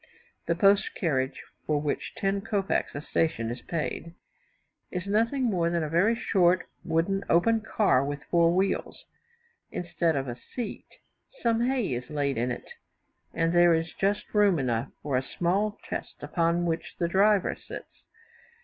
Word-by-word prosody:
The 170 - +2
post 195 +3 +3
carriage, 135 -7 -1 0.2
for 150 -1 +2
which 145 -1 -3
ten 195 0 0
kopecs 195 -6 -1
a 145 - -3
station 130 -8 0
is 120 0 -6
paid, 165 +1 -4 0.7
is 180 -1 -4
nothing 230 +7 +1
more 180 -8 +1
than 170 -1 0
a 155 - -3
very 190 +9 +3
short, 185 -5 +2 0.2
wooden, 170 +4 0
open 225 +7 +4
car, 205 -11 +2
with 145 +1 -4
four 170 -1 +3
wheels. 190 +2 -1 0.7
Instead 170 -2 0
of 135 -1 -1
a 120 0 -5 0.2
seat, 240 -4 -5 0.6
some 235 +1 +2
hay 255 - 0
is 125 +2 -5
laid 140 -4 -1
in 120 +2 0
it, 120 - -5 0.7
and 165 0 +1
there 175 -1 +6
is 160 0 -2
just 205 +2 -1
room 205 -4 +4
enough 120 -2 -1
for 140 -3 0
a - - +1
small 195 +9 -1
chest, - - -5
upon 170 0 +1
which 165 -1 -3
the 170 - 0
driver 195 +2 +3
sits. - - -11
170 Hz, 160 wpm, -27 LUFS, 150-200 Hz, 0.7 s, there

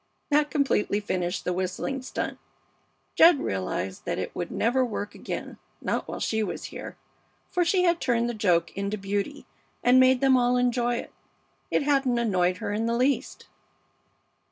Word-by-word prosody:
That 295 +1 +3
completely 275 -9 +1
finished 185 -3 -2
the 180 - 0
whistling 185 +9 -3
stunt. 255 - -4 0.7
Jed 330 -3 +7
realized 95 -1 -3
that - - -2
it - - -4
would - - -3
never 250 +3 +1
work 210 -4 -4
again, - - -6 0.2
not - - -2
while - - -5
she 220 0 0
was 215 - -3
here, - - -8 0.5
for 360 - +2
she 360 +2 +2
had 345 -1 +2
turned 235 -2 +1
the 240 - -2
joke 175 -6 +1
into 200 +1 -2
beauty 205 +9 -3 0.4
and 250 +1 +6
made 260 0 +5
them 270 0 +4
all 245 0 +3
enjoy 245 -1 +1
it. - - -6 0.6
It - - +1
hadn't 275 -4 +2
annoyed 185 -6 +1
her 205 - -3
in 225 +2 -1
the 235 0 0
least. 260 +3 0
235 Hz, 165 wpm, -26 LUFS, 200-270 Hz, 0.7 s, Jed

